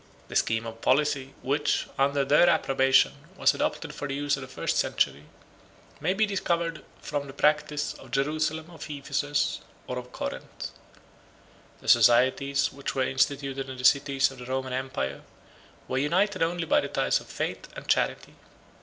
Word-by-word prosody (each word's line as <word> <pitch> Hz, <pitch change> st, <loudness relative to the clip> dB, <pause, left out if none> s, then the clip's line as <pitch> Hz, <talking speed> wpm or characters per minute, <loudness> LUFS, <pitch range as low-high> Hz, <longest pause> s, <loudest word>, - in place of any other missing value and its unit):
The -, -, -8 dB
scheme 115 Hz, 0 st, +1 dB
of 115 Hz, 0 st, -8 dB
policy, 135 Hz, 0 st, +1 dB
which, 145 Hz, +3 st, +1 dB
under 140 Hz, 0 st, +2 dB
their 150 Hz, +5 st, +5 dB
approbation, 135 Hz, -5 st, +4 dB, 0.3 s
was -, -, +4 dB
adopted -, -, -2 dB
for 145 Hz, -, -5 dB
the 135 Hz, -, -3 dB
use 145 Hz, 0 st, +1 dB
of 135 Hz, -, -8 dB
the 135 Hz, -, -7 dB
first 130 Hz, -, -2 dB
century, 70 Hz, +2 st, 0 dB, 0.7 s
may 185 Hz, -, 0 dB
be 215 Hz, +2 st, +3 dB
discovered 170 Hz, -5 st, -1 dB, 0.2 s
from 145 Hz, -1 st, -3 dB
the 135 Hz, -, -9 dB
practice 150 Hz, 0 st, +1 dB
of 135 Hz, -, -14 dB
Jerusalem, 155 Hz, +4 st, -1 dB
of 160 Hz, -3 st, -9 dB
Ephesus, 145 Hz, 0 st, -1 dB, 0.3 s
or -, -, -4 dB
of -, -, -11 dB
Corinth. -, -, -6 dB, 1.1 s
The -, -, -13 dB
societies 125 Hz, +4 st, +4 dB
which 140 Hz, 0 st, -5 dB
were 130 Hz, -, +2 dB
instituted 135 Hz, 0 st, 0 dB
in 130 Hz, -, -7 dB
the 125 Hz, -, -4 dB
cities 135 Hz, -1 st, +4 dB
of 135 Hz, -, -12 dB
the 125 Hz, -, -8 dB
Roman 130 Hz, 0 st, -2 dB
empire 130 Hz, -, -3 dB, 0.7 s
were 130 Hz, -, -1 dB
united 185 Hz, +7 st, +1 dB
only 170 Hz, +1 st, 0 dB
by 295 Hz, 0 st, +3 dB
the -, -, -3 dB
ties -, -, +1 dB
of -, -, -14 dB
faith -, -, -4 dB
and -, -, -9 dB
charity. -, -, 0 dB
140 Hz, 165 wpm, -27 LUFS, 130-150 Hz, 1.1 s, their